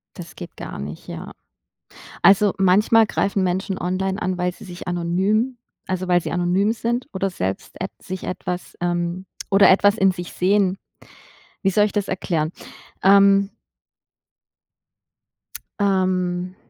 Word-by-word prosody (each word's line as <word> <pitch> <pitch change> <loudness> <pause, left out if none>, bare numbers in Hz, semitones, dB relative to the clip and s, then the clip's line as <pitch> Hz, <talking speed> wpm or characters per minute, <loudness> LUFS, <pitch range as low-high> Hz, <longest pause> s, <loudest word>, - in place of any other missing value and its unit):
Das - - -10
geht - - -9
gar - - -7
nicht, 75 +3 -7
ja. - - -7 0.9
Also, 200 0 +5
manchmal 210 +4 +4
greifen 200 -2 0
Menschen 185 +2 -1
online 190 +2 -2
an, 185 0 -2
weil 180 0 0
sie - - -14
sich 180 -1 -9
anonym 190 +8 0 0.3
also 185 0 -2
weil 175 -1 +3
sie - - -5
anonym 180 +5 +1
sind 240 +2 -2
oder 190 0 -1
selbst 95 - -4
et 190 - -2
sich 185 0 -7
etwas, 180 -1 -5
ähm, 175 +1 -1 0.3
oder 195 0 +6
etwas 205 +2 +4
in 195 -3 +4
sich 175 -1 -7
sehen. 195 0 +2 0.9
Wie 195 - +2
soll 210 +2 +3
ich 210 - -2
das 205 -2 -1
erklären? 165 -4 -1 0.5
Ähm. 200 +1 +5 2.3
Ähm. 185 -2 0
185 Hz, 135 wpm, -22 LUFS, 180-200 Hz, 2.3 s, oder